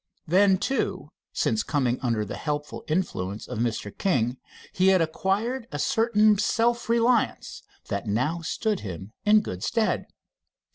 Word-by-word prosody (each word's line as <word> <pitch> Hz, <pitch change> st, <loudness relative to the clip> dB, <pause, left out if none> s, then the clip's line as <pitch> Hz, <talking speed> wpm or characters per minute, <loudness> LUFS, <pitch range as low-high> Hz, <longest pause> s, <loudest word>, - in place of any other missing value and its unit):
Then, 190 Hz, +3 st, +4 dB
too, 270 Hz, +8 st, -2 dB, 0.2 s
since 220 Hz, -, 0 dB
coming 130 Hz, -, 0 dB
under 115 Hz, -4 st, 0 dB
the -, -, -6 dB
helpful 150 Hz, -1 st, -4 dB
influence 110 Hz, -, -2 dB
of -, -, -5 dB
Mr. 115 Hz, -3 st, -2 dB
King, 125 Hz, -, 0 dB, 0.4 s
he 185 Hz, +1 st, +2 dB
had 190 Hz, -1 st, +5 dB
acquired 205 Hz, +9 st, -1 dB
a -, -, -3 dB
certain 215 Hz, -4 st, +3 dB
self 235 Hz, +2 st, +1 dB
reliance 235 Hz, 0 st, +1 dB, 0.3 s
that 100 Hz, +2 st, -3 dB
now 130 Hz, +11 st, 0 dB
stood 210 Hz, +5 st, -1 dB
him 95 Hz, +1 st, -7 dB
in 210 Hz, 0 st, +6 dB
good 90 Hz, -, -6 dB
stead. 220 Hz, -, 0 dB
185 Hz, 140 wpm, -26 LUFS, -, 0.4 s, in